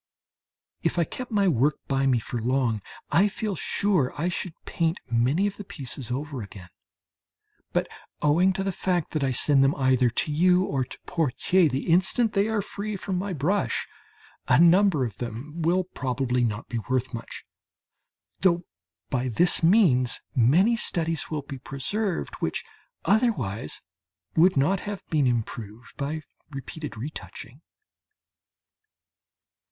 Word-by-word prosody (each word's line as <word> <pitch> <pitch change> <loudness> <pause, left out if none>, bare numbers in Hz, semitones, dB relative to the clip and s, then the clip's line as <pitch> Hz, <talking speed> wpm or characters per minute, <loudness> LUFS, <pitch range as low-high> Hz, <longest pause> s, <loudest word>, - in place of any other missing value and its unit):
If - - 0
I 170 - +4
kept 255 +9 -7
my 205 -3 +2
work 145 -2 +3
by 135 0 +1
me 130 -2 +4
for 120 +1 -4
long, 120 -3 +1 0.3
I 190 +5 +5
feel 210 0 -3
sure 180 -6 +1
I 170 +4 +1
should 175 -1 -4
paint 165 0 -1
many 130 +11 +2
of 205 - -2
the 205 - -6
pieces 135 - -6
over 140 +1 -3
again. 95 -3 -10 1.0
But - - 0 0.3
owing 170 +6 +4
to 190 - -2
the 195 - 0
fact 180 -3 -1
that 155 -3 -1
I 135 - +1
send 135 +2 +3
them 135 +1 +3
either 130 -2 +3
to 150 +7 -1
you 180 +4 +4
or 135 -7 -1
to - - -10
Pottier 165 +2 +2
the 135 +1 -2
instant 190 +7 +3
they 200 +1 +2
are 220 -2 0
free 210 +1 -5
from 185 -1 -3
my 200 +1 -3
brush, 180 +6 0 0.6
a 125 - +5
number 170 -4 +5
of 110 -4 -6
them 125 +8 -6
will 175 +3 +2
probably 125 -6 -1
not 110 -1 -2
be 120 - -3
worth 130 0 0
much, 115 0 -7 0.9
though 175 -2 +3 0.5
by 130 -1 0
this 175 +10 +3
means 165 - +4
many 165 - +4
studies 165 -7 0
will 150 -3 -3
be 135 -1 -8
preserved 180 - -2
which - - -2 0.4
otherwise 160 - 0 0.5
would 175 0 +5
not 165 +8 +3
have 205 -1 -6
been 150 -4 +3
improved 115 -1 -4
by 150 +2 -3 0.3
repeated 140 -2 -7
retouching. 140 +2 -8
150 Hz, 145 wpm, -26 LUFS, 130-185 Hz, 1.0 s, I